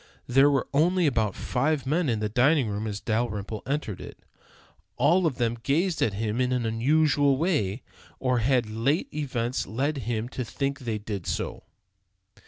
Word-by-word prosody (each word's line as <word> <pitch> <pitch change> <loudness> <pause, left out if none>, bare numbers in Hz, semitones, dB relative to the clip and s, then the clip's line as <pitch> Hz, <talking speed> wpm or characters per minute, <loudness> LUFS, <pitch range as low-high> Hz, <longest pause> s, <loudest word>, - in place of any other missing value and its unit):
There 135 +3 +5
were 135 -3 +1
only 175 +5 +3
about 110 -8 +1
five 140 +2 0
men 155 +2 +1
in 110 -3 0
the 105 - 0
dining 130 +4 +3
room 105 +2 -3
as 105 -1 -4
Dalrymple 110 -2 -2
entered 135 -9 -2
it. - - -9 0.8
All 165 +7 +4
of 135 -6 -3
them 120 -1 0
gazed 165 +6 0
at 105 - +2
him 110 +3 -1
in 125 0 +1
an 125 -2 0
unusual 140 +4 +3
way, 135 - 0 0.4
or 125 -2 +1
had 120 0 +2
late 115 +9 -1
events 125 -5 -2
led 135 +9 -1
him 115 0 -1
to 130 - -4
think 135 +5 -3
that 130 - -12
they 110 -2 -1
did 105 -3 -6
so? - - -3
125 Hz, 175 wpm, -26 LUFS, 110-145 Hz, 0.8 s, There